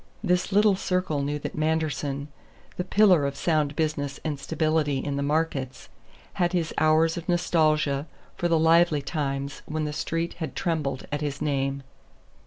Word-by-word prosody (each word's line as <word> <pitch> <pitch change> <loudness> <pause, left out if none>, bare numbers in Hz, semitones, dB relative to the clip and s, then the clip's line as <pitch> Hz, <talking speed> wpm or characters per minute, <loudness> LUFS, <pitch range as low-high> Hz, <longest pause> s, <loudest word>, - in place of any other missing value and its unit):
This 180 -1 +1
little 205 0 +5
circle 180 -6 -1
knew 145 +1 -1
that 145 - -5
Manderson, 155 -2 -1 0.5
the 180 - -2
pillar 185 -4 +4
of 140 - -4
sound 150 -2 0
business 150 -3 -2
and 150 -3 -2
stability 155 -1 0
in 140 +1 -3
the 140 - -1
markets, 140 -3 -2 0.5
had 175 +1 +2
his 170 -3 -1
hours 160 +1 +3
of 170 +2 -7
nostalgia 155 -4 +2 0.3
for 175 - 0
the 165 -1 +3
lively 165 -2 +4
times 140 -2 -3
when 155 0 -2
the 150 - -3
Street 165 +2 -2
had 160 -5 -4
trembled 150 -7 -2
at 145 0 -2
his 145 -2 -3
name. 140 -2 -1
155 Hz, 160 wpm, -26 LUFS, 140-165 Hz, 0.5 s, little